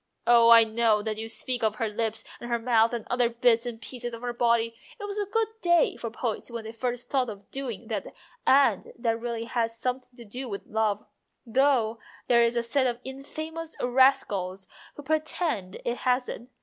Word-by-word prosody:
Oh, 235 Hz, -1 st, +6 dB
I 230 Hz, -1 st, +9 dB
know 220 Hz, -1 st, +2 dB
that 215 Hz, 0 st, -3 dB
you 225 Hz, 0 st, -5 dB
speak 245 Hz, +2 st, -1 dB
of 215 Hz, -1 st, +2 dB
her 225 Hz, +1 st, -1 dB
lips 225 Hz, +1 st, -2 dB, 0.2 s
and 240 Hz, -, -7 dB
her 235 Hz, -, +1 dB
mouth 230 Hz, -1 st, +3 dB
and 235 Hz, -2 st, -4 dB
other 245 Hz, -1 st, +2 dB
bits 235 Hz, 0 st, +2 dB
and 230 Hz, -2 st, -5 dB
pieces 240 Hz, +1 st, -5 dB
of 230 Hz, -, -12 dB
her 245 Hz, -1 st, -2 dB
body 235 Hz, -1 st, +2 dB, 0.3 s
it -, -, -7 dB
was 410 Hz, 0 st, -3 dB
a 410 Hz, -, -1 dB
good 450 Hz, +2 st, 0 dB
day 345 Hz, -2 st, +3 dB
for 230 Hz, -, -5 dB
poets 230 Hz, 0 st, -4 dB
when 235 Hz, -1 st, -6 dB
they 220 Hz, -, -7 dB
first 245 Hz, +1 st, -3 dB
thought 260 Hz, -3 st, 0 dB
of 200 Hz, -2 st, -10 dB
doing 245 Hz, -5 st, -5 dB
that 210 Hz, -4 st, -3 dB, 0.4 s
and 265 Hz, -7 st, +4 dB
that 230 Hz, -1 st, 0 dB
really 235 Hz, -1 st, -3 dB
has 230 Hz, -1 st, -1 dB
something 250 Hz, +1 st, -2 dB
to 235 Hz, -, -11 dB
do 250 Hz, +4 st, -6 dB
with 200 Hz, -1 st, -6 dB
love, 215 Hz, -1 st, -1 dB, 0.4 s
though 235 Hz, -2 st, +2 dB, 0.3 s
there 240 Hz, -1 st, +5 dB
is 235 Hz, 0 st, +3 dB
a 235 Hz, -, +1 dB
set 260 Hz, +3 st, +2 dB
of 240 Hz, -1 st, -1 dB
infamous 315 Hz, +5 st, -6 dB
rascals 240 Hz, -8 st, +2 dB, 0.3 s
who 290 Hz, -, -9 dB
pretend 310 Hz, -, -1 dB
it 240 Hz, +1 st, -1 dB
hasn't. 250 Hz, -1 st, -1 dB
235 Hz, 200 wpm, -27 LUFS, 225-255 Hz, 0.4 s, I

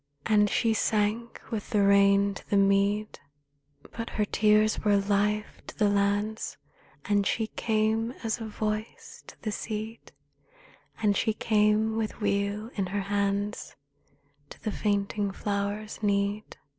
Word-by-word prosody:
' 140 Hz, -, -38 dB
And 210 Hz, -1 st, +4 dB
she 225 Hz, +1 st, +2 dB
sank 220 Hz, +2 st, 0 dB
in 225 Hz, -, 0 dB, 0.2 s
rain 200 Hz, 0 st, +4 dB
to -, -, -12 dB
the 200 Hz, -, +3 dB
mead; 200 Hz, +2 st, +2 dB, 0.7 s
But 230 Hz, 0 st, -5 dB
her 210 Hz, -, 0 dB
tears 215 Hz, +1 st, +3 dB
were 205 Hz, -1 st, +4 dB
life 205 Hz, +1 st, 0 dB
to -, -, -10 dB
the 210 Hz, -, +3 dB
lands, 205 Hz, +2 st, 0 dB, 0.5 s
And 205 Hz, -2 st, +2 dB
she 225 Hz, -, 0 dB
came 220 Hz, +1 st, 0 dB
as 225 Hz, +1 st, -1 dB
a 225 Hz, -, -4 dB
voice 215 Hz, +1 st, -5 dB
to -, -, -13 dB
the 215 Hz, -, -2 dB
seed, 220 Hz, +1 st, -5 dB, 0.9 s
And 205 Hz, -1 st, +3 dB
she 220 Hz, +2 st, +1 dB
came 215 Hz, 0 st, +2 dB
with 220 Hz, 0 st, -3 dB
weal 205 Hz, +2 st, -1 dB
in 195 Hz, -3 st, -2 dB
her 200 Hz, +2 st, -2 dB
hands 200 Hz, +1 st, -2 dB, 0.7 s
To -, -, -12 dB
the 215 Hz, -, -1 dB
fainting 205 Hz, 0 st, -1 dB
flower's 205 Hz, +2 st, -3 dB
need. 200 Hz, 0 st, -1 dB
210 Hz, 140 wpm, -28 LUFS, 200-215 Hz, 0.9 s, And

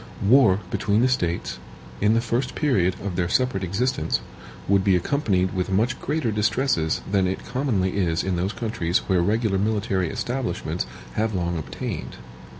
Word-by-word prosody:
War 110 Hz, -5 st, +5 dB
between 105 Hz, +2 st, +1 dB
the 125 Hz, -, +4 dB
States, 85 Hz, -9 st, -1 dB, 0.4 s
in 105 Hz, +2 st, +4 dB
the 115 Hz, -, +3 dB
first 120 Hz, +2 st, -1 dB
period 95 Hz, -, +2 dB
of 95 Hz, -3 st, -3 dB
their 85 Hz, -1 st, 0 dB
separate 125 Hz, -3 st, +1 dB
existence, 95 Hz, -3 st, 0 dB, 0.5 s
would 100 Hz, -1 st, +3 dB
be 95 Hz, -2 st, +4 dB
accompanied 95 Hz, -, +1 dB
with 90 Hz, 0 st, -1 dB
much 115 Hz, +6 st, +1 dB
greater 150 Hz, -7 st, -1 dB
distresses 105 Hz, -, +1 dB
than 95 Hz, -2 st, +3 dB
it 95 Hz, -, -3 dB
commonly 115 Hz, -8 st, 0 dB
is 85 Hz, -4 st, +1 dB
in 95 Hz, -1 st, -1 dB
those 90 Hz, +4 st, -1 dB
countries 90 Hz, -7 st, -1 dB
where 95 Hz, -2 st, +3 dB
regular 105 Hz, +1 st, +1 dB
military 100 Hz, -4 st, 0 dB
establishments 120 Hz, -, -3 dB, 0.3 s
have 110 Hz, -1 st, 0 dB
long 85 Hz, -1 st, -1 dB
obtained. 80 Hz, -, -5 dB
100 Hz, 155 wpm, -24 LUFS, 90-115 Hz, 0.5 s, War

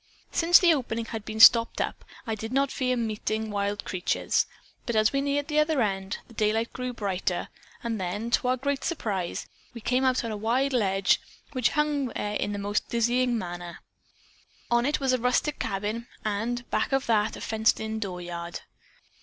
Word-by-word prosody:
Since 340 Hz, +1 st, +6 dB
the 350 Hz, -3 st, +5 dB
opening 230 Hz, -5 st, -2 dB
had 225 Hz, -2 st, -6 dB
been 220 Hz, 0 st, -5 dB
stopped 230 Hz, +1 st, +8 dB
up -, -, -2 dB, 0.2 s
I 225 Hz, -, -2 dB
did 220 Hz, +1 st, -5 dB
not 275 Hz, +1 st, +2 dB
fear 255 Hz, -2 st, 0 dB
meeting 220 Hz, -1 st, -2 dB
wild 205 Hz, 0 st, -2 dB
creatures, 185 Hz, -1 st, 0 dB, 0.4 s
but 235 Hz, -, -1 dB
as 215 Hz, +2 st, +3 dB
we 275 Hz, -, +2 dB
neared 285 Hz, 0 st, 0 dB
the 305 Hz, -1 st, +1 dB
other 305 Hz, -1 st, +2 dB
end, 195 Hz, -3 st, -1 dB
the 235 Hz, -, -16 dB
daylight 220 Hz, +1 st, 0 dB
grew 250 Hz, -1 st, -3 dB
brighter 195 Hz, -5 st, -2 dB, 0.3 s
and 225 Hz, -4 st, -2 dB
then 205 Hz, +6 st, -3 dB
to 250 Hz, -, +2 dB
our 255 Hz, +1 st, +2 dB
great 280 Hz, +2 st, -2 dB
surprise 205 Hz, -, -2 dB, 0.3 s
we -, -, -6 dB
came 250 Hz, +4 st, +1 dB
out 260 Hz, -1 st, +3 dB
upon 230 Hz, -, -4 dB
a 215 Hz, -, -3 dB
wide 250 Hz, +6 st, +1 dB
ledge 195 Hz, -5 st, +2 dB, 0.3 s
which 255 Hz, -4 st, +2 dB
hung 295 Hz, -2 st, +1 dB
there 210 Hz, -3 st, -3 dB
in 205 Hz, -, -1 dB
the 205 Hz, -, -3 dB
most 205 Hz, +1 st, -1 dB
dizzying 240 Hz, +1 st, +2 dB
manner. 175 Hz, -3 st, -6 dB, 0.9 s
On 240 Hz, +2 st, +3 dB
it 295 Hz, -, +1 dB
was 265 Hz, -2 st, +1 dB
a 255 Hz, -, +2 dB
rustic 250 Hz, +5 st, +1 dB
cabin, 215 Hz, +3 st, -3 dB, 0.2 s
and 230 Hz, +4 st, -2 dB
back -, -, 0 dB
of 270 Hz, 0 st, +2 dB
that 215 Hz, -2 st, +2 dB
a -, -, -9 dB
fenced 220 Hz, 0 st, +2 dB
in 220 Hz, 0 st, -3 dB
dooryard. 175 Hz, -3 st, -5 dB
225 Hz, 185 wpm, -27 LUFS, 205-255 Hz, 0.9 s, stopped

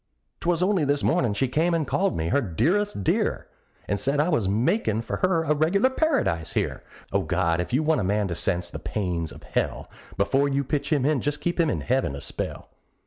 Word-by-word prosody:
'Twas 175 Hz, 0 st, +1 dB
only 190 Hz, -3 st, +2 dB
this 145 Hz, 0 st, +1 dB
mornin' 120 Hz, -5 st, +2 dB
she 130 Hz, +6 st, 0 dB
came 165 Hz, +6 st, +1 dB
and 160 Hz, -2 st, 0 dB
called 195 Hz, +8 st, 0 dB
me 80 Hz, 0 st, -1 dB
her 140 Hz, -, +2 dB
"dearest 165 Hz, -, 0 dB
dear," -, -, 0 dB, 0.4 s
And 100 Hz, -, 0 dB
said 140 Hz, +7 st, 0 dB
I 155 Hz, +4 st, +2 dB
was 120 Hz, -, +1 dB
makin' 110 Hz, -, +1 dB
for -, -, -3 dB
her 185 Hz, -3 st, +2 dB
a 150 Hz, -, +2 dB
regular 180 Hz, -, +2 dB
paradise 260 Hz, -, 0 dB
here; -, -, -1 dB, 0.3 s
O -, -, +2 dB
God! 85 Hz, +1 st, +1 dB
if 90 Hz, -, -5 dB
you 135 Hz, +5 st, +2 dB
want 155 Hz, -3 st, +2 dB
a -, -, -1 dB
man 100 Hz, +2 st, +1 dB
to -, -, -2 dB
sense 85 Hz, +1 st, -1 dB
the 85 Hz, -, -7 dB
pains 90 Hz, -6 st, -2 dB
of -, -, -12 dB
hell, -, -, -2 dB, 0.3 s
Before 135 Hz, +8 st, +2 dB
you 140 Hz, 0 st, 0 dB
pitch 140 Hz, +1 st, -2 dB
him 140 Hz, -4 st, +2 dB
in 145 Hz, -3 st, +2 dB
just 145 Hz, 0 st, -2 dB
keep 175 Hz, +1 st, -2 dB
him 165 Hz, -2 st, +3 dB
in -, -, -1 dB
heaven 125 Hz, -, 0 dB
a 70 Hz, -, -7 dB
spell! -, -, -5 dB
140 Hz, 220 wpm, -25 LUFS, 100-165 Hz, 0.4 s, him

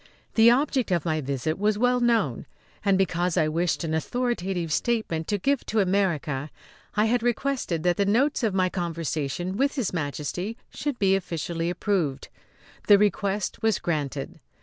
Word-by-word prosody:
The 225 Hz, +1 st, +7 dB
object 260 Hz, -1 st, +2 dB
of 175 Hz, -3 st, 0 dB
my 155 Hz, -2 st, 0 dB
visit 140 Hz, +4 st, -2 dB
was 210 Hz, 0 st, +2 dB
well 250 Hz, +2 st, +3 dB
known; 230 Hz, -, +1 dB, 0.4 s
and, 200 Hz, -2 st, +3 dB
because 180 Hz, -2 st, 0 dB
I 155 Hz, -, +3 dB
wished 170 Hz, +2 st, 0 dB
an 160 Hz, -1 st, -2 dB
authoritative 190 Hz, -3 st, -1 dB
statement 215 Hz, -10 st, -1 dB
to 205 Hz, -, 0 dB
give 275 Hz, +6 st, 0 dB
to 220 Hz, -, +1 dB
America, 170 Hz, -8 st, 0 dB, 0.5 s
I 210 Hz, +1 st, +3 dB
had 240 Hz, +1 st, +2 dB
requested 240 Hz, -, -1 dB
that 175 Hz, -1 st, +2 dB
the 200 Hz, -, +2 dB
notes 260 Hz, +9 st, +2 dB
of 215 Hz, -5 st, 0 dB
my 185 Hz, -1 st, +3 dB
conversation 170 Hz, 0 st, -3 dB
with 275 Hz, +3 st, +1 dB
His 245 Hz, -10 st, -1 dB
Majesty 165 Hz, -, -3 dB, 0.2 s
should 290 Hz, -3 st, -3 dB
be 195 Hz, -3 st, +3 dB
officially 170 Hz, -2 st, -2 dB
approved. 175 Hz, -6 st, -1 dB, 0.6 s
This 205 Hz, -, +8 dB
request 205 Hz, -1 st, 0 dB
was 220 Hz, -3 st, +2 dB
granted. 145 Hz, -4 st, -3 dB
190 Hz, 160 wpm, -26 LUFS, 165-225 Hz, 0.6 s, This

